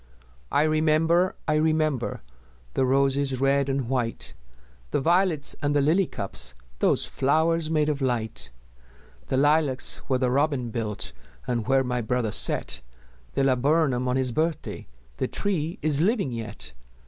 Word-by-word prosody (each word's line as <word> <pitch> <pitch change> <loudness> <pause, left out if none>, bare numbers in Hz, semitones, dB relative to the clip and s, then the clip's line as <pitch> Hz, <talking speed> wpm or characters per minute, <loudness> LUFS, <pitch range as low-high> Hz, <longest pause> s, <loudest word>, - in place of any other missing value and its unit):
I 145 - +3
remember, 160 +3 +2
I 155 - +2
remember 155 - 0 0.5
The 130 - +1
roses 135 0 +1
red 140 0 +2
and 135 -3 -1
white, 120 -3 -2 0.6
The - - 0
violets 165 -1 +2
and 145 -1 0
the - - +4
lily 165 +6 +2
cups 65 -10 -1 0.2
Those - - +2
flowers 160 +4 +1
made 155 -2 +1
of 145 -2 -1
light! 110 - -2 0.8
The - - 0
lilacs 145 -2 +3
where 130 - +1
the 125 -1 0
robin 135 -3 0
built, 110 -2 -4 0.3
And 120 -2 -2
where 135 0 +3
my 125 -1 -2
brother 120 -1 -1
set - - +1 0.5
The - - +1
laburnum 135 0 +2
on 125 - 0
his 130 -1 +1
birthday, 160 +5 -2 0.3
The - - -1
tree 170 -5 -2
is 150 -1 +4
living 195 - +1
yet! 110 - -5
140 Hz, 145 wpm, -25 LUFS, 125-155 Hz, 0.8 s, the